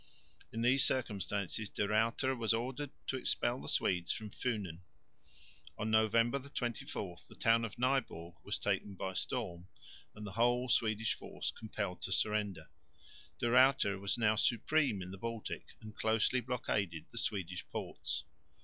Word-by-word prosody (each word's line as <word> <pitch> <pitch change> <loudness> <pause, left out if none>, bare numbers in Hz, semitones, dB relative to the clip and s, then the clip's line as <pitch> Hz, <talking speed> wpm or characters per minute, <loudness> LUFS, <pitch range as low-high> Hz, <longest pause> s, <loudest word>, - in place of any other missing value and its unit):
In 115 0 -2
these 130 +2 +5
circumstances 105 -3 0
De 105 - -1
Ruyter 115 +5 +2
was 115 -2 +2
ordered 130 +5 -3 0.2
to 130 - -1
expel 125 -1 0
the - - -5
Swedes 90 -2 +1
from 105 -2 -4
Funen. 100 -10 -2 1.0
On 110 +1 -1
November 115 +4 +4
24 120 -9 -4
the - - -12
town 115 0 +4
of 115 - -4
Nyborg 125 -10 0
was - - -1
taken 100 - -1
by 95 0 -3
storm 85 -1 -2 0.5
and 105 0 -7
the 100 - -5
whole 120 +3 +2
Swedish 110 -2 +2
force - - -4
compelled 100 -4 -4
to - - -3
surrender. 105 -1 +1 0.7
De - - -2
Ruyter 130 -6 +5
was 100 +4 0
now 110 -2 +4
supreme 120 -1 +2
in 90 - -8
the 95 - -8
Baltic 115 0 -4 0.2
and 110 0 -10
closely 115 +3 +2
blockaded 100 -9 -1
the 115 - -1
Swedish 90 -5 -1
ports. - - -3
110 Hz, 150 wpm, -35 LUFS, 100-120 Hz, 1.0 s, these